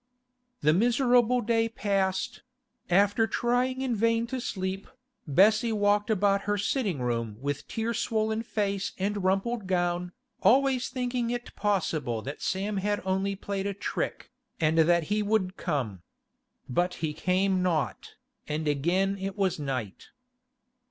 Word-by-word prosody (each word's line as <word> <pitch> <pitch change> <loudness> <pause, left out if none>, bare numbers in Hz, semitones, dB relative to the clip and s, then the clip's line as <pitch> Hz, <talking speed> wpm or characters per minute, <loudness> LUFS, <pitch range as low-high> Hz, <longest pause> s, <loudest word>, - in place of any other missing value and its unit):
The 150 - +4
miserable 245 - +3
day 225 0 +1
passed; 195 -4 -1 0.5
after 205 +5 +3
trying 250 +3 0
in 250 -3 0
vain 230 +2 +2
to 255 - -1
sleep, 190 -2 -3 0.4
Bessie 215 - +4
walked 205 0 +2
about 200 -1 +2
her 205 - +2
sitting 200 - -1
room 115 -3 -2
with 140 +1 -3
tear 225 +1 -2
swollen 220 -1 0
face 205 -3 -2
and 200 +1 -1
rumpled 195 +3 0
gown, 175 -1 0 0.3
always 260 0 +3
thinking 245 -2 -2
it 240 0 -4
possible 155 - -1
that 140 +2 -6
Sam 200 +2 -1
had 205 +2 0
only 190 +1 0
played 195 0 -3
a 200 - -3
trick, - - -4 0.3
and 160 0 +2
that 170 +1 +4
he 210 - +1
would 205 -3 0
come. 110 - -2 0.7
But 175 +8 0
he 150 - -2
came 185 +3 +1
not, 170 -5 -1 0.3
and 155 +1 -2
again 180 +7 +1
it 195 +1 -4
was 190 -5 0
night. 130 -8 -4
195 Hz, 140 wpm, -28 LUFS, 175-225 Hz, 0.7 s, The